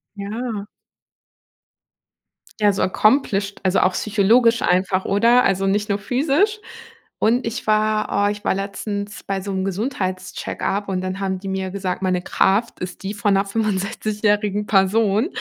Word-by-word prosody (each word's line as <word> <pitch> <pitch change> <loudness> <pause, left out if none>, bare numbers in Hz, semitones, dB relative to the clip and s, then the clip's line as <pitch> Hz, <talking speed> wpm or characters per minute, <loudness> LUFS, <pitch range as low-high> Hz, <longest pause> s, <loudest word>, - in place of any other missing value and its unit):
Ja. 210 +1 -4 2.0
Ja, 205 -1 +4
so - - -2
accomplished, 200 -2 +1
also, 190 0 +2
auch 185 - +2
psychologisch 230 +4 +3
einfach, 185 +1 +1
oder? 235 +5 +4
Also, 195 0 +1
nicht 205 +2 +1
nur 200 - +1
physisch. 295 - +1 0.6
Und 235 +3 +2
ich 230 +2 -4
war 215 -1 +1
oh, - - +2
ich 205 0 -7
war - - +2
letztens 200 +1 -5
bei 195 -1 -2
so 200 +1 -5
'nem 190 0 -1
Gesundheits-Check-up 195 -1 -3
und 185 -1 -1
dann 185 +1 -4
haben 190 -1 -2
die 195 - -8
mir 190 0 -2
gesagt: 190 -2 -3
„Meine 185 -1 0
Kraft 200 +6 +1
ist 180 +1 -6
die 195 +1 -3
von 205 -1 +1
'ner 195 +1 +2
fünfundsechzigjährigen 210 0 -1
Person.“ 205 +4 +3
200 Hz, 150 wpm, -21 LUFS, 190-215 Hz, 2.0 s, Ja